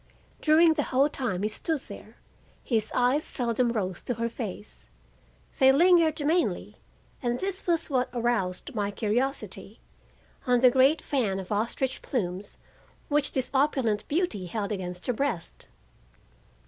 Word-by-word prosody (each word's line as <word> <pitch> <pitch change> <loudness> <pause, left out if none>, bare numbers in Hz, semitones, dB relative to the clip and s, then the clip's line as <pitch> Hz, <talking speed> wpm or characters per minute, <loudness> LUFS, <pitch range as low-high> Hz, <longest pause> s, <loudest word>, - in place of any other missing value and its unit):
During 320 +1 +5
the 295 -3 -1
whole 270 +3 +3
time 230 -10 -3
he - - +2
stood 290 +7 -2
there - - -11 0.5
his 220 -3 0
eyes 255 +5 +2
seldom 240 0 0
rose 190 -6 -2
to 245 - -3
her 230 +1 -2
face; 210 -3 -5 0.7
they 265 -1 +7
lingered 320 0 +4
mainly 335 +4 0 0.4
and 240 -2 -1
this 385 0 -3
was 335 -2 +2
what 255 -4 0
aroused 235 -7 -1
my 205 -3 -1
curiosity—on 245 +2 -3
the 255 -1 +7
great 270 +5 +4
fan 220 -9 0
of 190 +1 -8
ostrich 235 +5 -1
plumes 195 -5 -3 0.5
which 295 -1 +1
this 260 -2 -1
opulent 265 -7 +1
beauty 290 - -1
held 205 +1 -3
against 180 -3 -4
her 250 - 0
breast. 230 -9 -3
250 Hz, 135 wpm, -27 LUFS, 210-285 Hz, 0.7 s, they